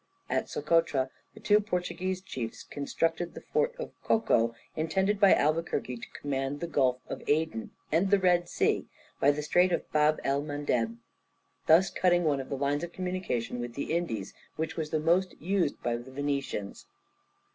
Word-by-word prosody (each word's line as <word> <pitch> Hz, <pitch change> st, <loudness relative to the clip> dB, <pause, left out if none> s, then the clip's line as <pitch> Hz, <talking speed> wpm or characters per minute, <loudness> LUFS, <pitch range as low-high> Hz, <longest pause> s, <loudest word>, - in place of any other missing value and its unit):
At -, -, 0 dB
Socotra, 145 Hz, -4 st, +1 dB, 0.2 s
the -, -, -11 dB
two 210 Hz, 0 st, +4 dB
Portuguese 185 Hz, -2 st, -2 dB
chiefs 125 Hz, -11 st, -5 dB
constructed 165 Hz, +4 st, -2 dB
the -, -, -7 dB
fort 475 Hz, +1 st, +2 dB
of -, -, -5 dB
Çoco, 115 Hz, -, +2 dB, 0.2 s
intended 190 Hz, +6 st, +1 dB
by 200 Hz, -2 st, +7 dB
Albuquerque 155 Hz, -4 st, 0 dB
to -, -, -10 dB
command 135 Hz, 0 st, -3 dB
the 170 Hz, -, -2 dB
Gulf 130 Hz, -6 st, +2 dB
of -, -, -5 dB
Aden 150 Hz, -7 st, 0 dB, 0.2 s
and 170 Hz, +5 st, +3 dB
the 200 Hz, -, +6 dB
Red 180 Hz, -2 st, +3 dB
Sea, -, -, +1 dB, 0.3 s
by 140 Hz, -, +5 dB
the 145 Hz, +1 st, +1 dB
Strait 180 Hz, +4 st, +3 dB
of -, -, -1 dB
Bab 150 Hz, 0 st, +3 dB
el 140 Hz, +1 st, +1 dB
Mandeb, 140 Hz, -6 st, -1 dB, 0.7 s
thus 170 Hz, +4 st, +6 dB
cutting 175 Hz, -1 st, +3 dB
one 145 Hz, -4 st, +2 dB
of 135 Hz, -, -6 dB
the 140 Hz, -, -2 dB
lines 145 Hz, +3 st, 0 dB
of 175 Hz, 0 st, -5 dB
communication 180 Hz, -11 st, -2 dB
with 120 Hz, -1 st, -5 dB
the 140 Hz, -, -2 dB
Indies, 115 Hz, -, -2 dB, 0.2 s
which 160 Hz, 0 st, -3 dB
was 160 Hz, -2 st, -3 dB
the 155 Hz, -, 0 dB
most 175 Hz, +4 st, +1 dB
used 180 Hz, -2 st, 0 dB
by 120 Hz, -1 st, 0 dB
the 120 Hz, +2 st, -10 dB
Venetians. 140 Hz, -7 st, -3 dB
155 Hz, 170 wpm, -29 LUFS, 135-180 Hz, 0.7 s, by